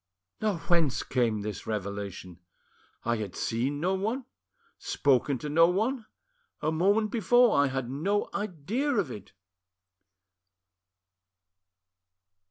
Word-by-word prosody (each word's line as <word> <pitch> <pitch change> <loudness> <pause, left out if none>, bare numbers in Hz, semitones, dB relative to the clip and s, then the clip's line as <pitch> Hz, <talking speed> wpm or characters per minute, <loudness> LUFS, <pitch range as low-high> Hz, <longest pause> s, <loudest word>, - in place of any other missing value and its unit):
"Now 210 -4 +1
whence 165 -4 +1
came 115 -4 0
this 105 -1 -6
revelation? 100 -4 -5 0.7
I 120 0 +1
had 105 -4 -5
seen 130 +5 -1
no 180 +5 +1
one, 220 +7 -2 0.5
spoken 140 0 +1
to 135 - -6
no 165 +3 +5
one; 220 +6 0 0.5
a 155 - 0
moment 200 +6 +2
before 240 +2 +4
I 140 0 +4
had 130 -2 -3
no 175 +11 0
idea 205 - -2
of 190 - 0
it!" 105 -3 -10
155 Hz, 110 wpm, -28 LUFS, -, 0.7 s, no